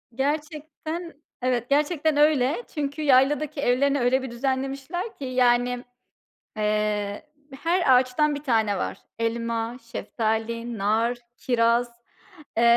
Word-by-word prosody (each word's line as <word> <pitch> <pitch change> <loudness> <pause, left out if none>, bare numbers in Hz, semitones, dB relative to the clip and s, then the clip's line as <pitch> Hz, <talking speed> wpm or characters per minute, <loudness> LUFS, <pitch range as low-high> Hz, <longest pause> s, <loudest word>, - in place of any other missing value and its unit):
Gerçekten, 310 +4 -3 0.3
evet, 245 -1 0
gerçekten 300 +1 +2
öyle 295 - +3
çünkü 290 -1 -3
yayladaki 280 +1 +3
evlerini 280 +2 +2
öyle 250 +2 +2
bir 260 -2 -6
düzenlemişler 270 - -3
ki, 275 - -7
yani, 245 -1 +2 0.7
eee, 210 +1 -1 0.3
her 340 -5 +3
ağaçtan 255 +4 +3
bir 285 - -6
tane 220 -7 +1
var. - - -3 0.2
Elma, 230 0 -2 0.2
şeftali, 230 +1 -2
nar, 225 +4 +1 0.2
kiraz, 235 0 +2 0.7
eee, 230 - +2
255 Hz, 110 wpm, -25 LUFS, 230-295 Hz, 0.7 s, öyle